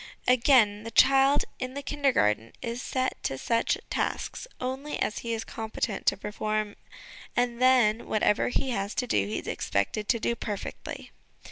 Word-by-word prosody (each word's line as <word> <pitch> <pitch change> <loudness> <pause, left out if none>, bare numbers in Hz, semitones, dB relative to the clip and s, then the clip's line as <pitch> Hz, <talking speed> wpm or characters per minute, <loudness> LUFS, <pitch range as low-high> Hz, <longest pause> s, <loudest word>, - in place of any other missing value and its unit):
Again, 240 -4 +5
the 225 - -6
child 270 +3 +5
in 255 +1 -4
the 280 - -4
Kindergarten 245 - +1
is 235 0 -3
set 260 -1 -2
to 135 - -2
such 230 - +1
tasks - - -2
only 265 +4 -3
as 210 - -1
he 235 - -4
is 225 -1 -2
competent 220 -2 -4
to - - +4
perform, 215 +1 -2 0.6
and 245 0 0
then, 240 -4 +4
whatever 210 -1 +2
he 260 +1 -1
has 200 -2 -2
to 250 - 0
do, 100 - +1
he 105 - -2
is - - -6
expected 100 - -1
to 230 - +3
do 235 - 0
perfectly. 210 -3 -6
230 Hz, 160 wpm, -28 LUFS, 210-255 Hz, 0.6 s, Again